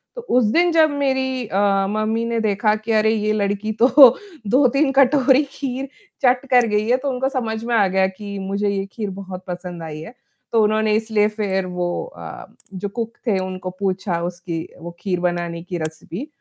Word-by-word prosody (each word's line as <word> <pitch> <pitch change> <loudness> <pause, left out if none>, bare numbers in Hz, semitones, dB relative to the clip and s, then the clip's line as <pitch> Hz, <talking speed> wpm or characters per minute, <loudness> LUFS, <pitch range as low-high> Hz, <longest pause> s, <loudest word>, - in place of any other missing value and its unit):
तो 485 - -6 0.2
उस 245 - +4
दिन 345 +1 +3
जब 320 -1 +5
मेरी 265 -3 -1
अ, 195 0 +2
मम्मी 215 +2 -1
ने 230 0 -1
देखा 210 0 +1
कि 215 +1 -5
अरे 220 0 +3
ये 215 -1 0
लड़की 205 +1 -1
तो 245 - +7 0.6
2-3 270 +4 +3
कटोरी 270 0 +4
खीर 270 0 -4 0.3
चट 250 +1 +3
कर 245 -1 +6
गई 210 +1 0
है, 250 - +4
तो 275 +1 -3
उनको 265 +1 -1
समझ 230 -5 -3
में 235 0 -1
आ 205 -4 +4
गया 190 0 +2
कि 200 +1 -8
मुझे 200 +1 -1
ये 195 -1 -2
खीर 210 -3 -4
बहुत 185 -1 -8
पसंद 175 -1 -6
आई 155 -1 -7
है। 195 +10 -10 0.4
तो 225 -2 +4
उन्होंने 215 0 +2
इसलिए 220 -1 +2
फ़िर 195 -3 -2
वो 180 -1 -2 0.3
अ, - - -9 0.3
जो 195 +2 -4
कुक 230 +2 -4
थे 200 -3 +2
उनको 185 0 -5
पूछा 190 -3 -1
उसकी 175 -2 -5
वो 170 0 -8
खीर 180 -3 -1
बनाने 175 -1 -2
की 180 -1 -5
रेसिपी 160 - -6
210 Hz, 190 wpm, -21 LUFS, 190-245 Hz, 0.6 s, तो